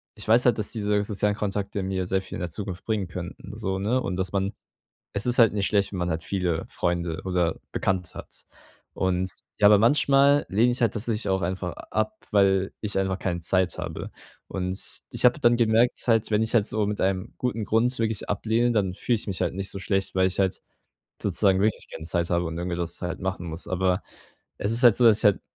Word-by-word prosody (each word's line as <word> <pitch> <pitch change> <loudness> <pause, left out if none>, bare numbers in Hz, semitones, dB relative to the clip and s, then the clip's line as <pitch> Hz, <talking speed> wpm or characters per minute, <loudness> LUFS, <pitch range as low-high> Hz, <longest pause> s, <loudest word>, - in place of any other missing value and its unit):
ich - - -8
weiß 115 +3 +5
halt, 120 -3 +4
dass 105 - 0
diese 105 -2 0
sozialen 105 0 0
Kontakte 100 -1 -2
mir 95 -1 -2
sehr 95 0 +1
viel - - -7
in - - -7
der 90 -1 -3
Zukunft 95 +1 -6
bringen 105 -5 -1
könnten, 90 +4 -8
so, 95 -3 -2
ne? 115 +7 0
Und 90 - -3
dass 95 -1 -2
man 100 +1 -1 0.6
es 100 - 0
ist 125 0 +1
halt 115 -3 +6
nicht 100 -2 0
schlecht, 100 -1 +1
wenn 95 - -4
man 90 0 -1
halt 80 0 -2
viele 90 -3 -1
Freunde 85 -1 -2
oder 90 -3 0
Bekannte 95 -2 -1
hat. - - -10 0.5
Und 95 0 0 0.3
ja, 105 - +7
aber 105 -1 +7
manchmal 140 +4 +4
lehne 115 +5 +3
ich 120 - -3
halt 115 - +3
tatsächlich 110 -1 -2
auch 95 0 +1
einfach 90 0 -2
ab, 110 0 -3
weil 95 -1 +3
ich 105 -2 -1
einfach 95 -1 0
keine 85 -2 -2
Zeit 90 +1 0
habe. - - -5 0.4
Und 95 0 -3 0.3
ich - - -2
habe 125 +4 +5
dann 120 -1 +4
gemerkt 115 +2 +2
halt, 115 -1 +2
wenn 105 +1 +2
ich 110 - -2
halt 105 -3 +4
so 110 -2 -1
mit 105 0 -3
einem 95 +3 -1
guten 115 -4 -2
Grund 120 +4 +1
wirklich 110 -2 -2
ablehne, 115 +4 +1
dann 95 -5 0
fühle 120 +4 0
ich 110 - -5
mich 95 -3 -2
halt - - 0
nicht 95 +1 -2
so - - -4
schlecht, 95 0 -1
weil 95 0 +3
ich 95 - -2
halt 95 -1 0 0.6
sozusagen 95 -2 +2
wirklich 105 +1 0
keine 80 - -8
Zeit 85 0 -1
habe 85 0 +1
und 80 +1 -4
irgendwie 85 0 -3
das 85 -1 -3
halt 90 -1 -4
machen 90 -2 -3
muss. 80 +1 -6
Aber 95 +1 +1 0.6
es 100 - -1
ist 120 +3 0
halt 120 -4 +7
so, 125 - +3
dass 110 -2 +6
ich - - -7
halt 105 -2 +4
100 Hz, 225 wpm, -25 LUFS, 95-110 Hz, 0.6 s, ja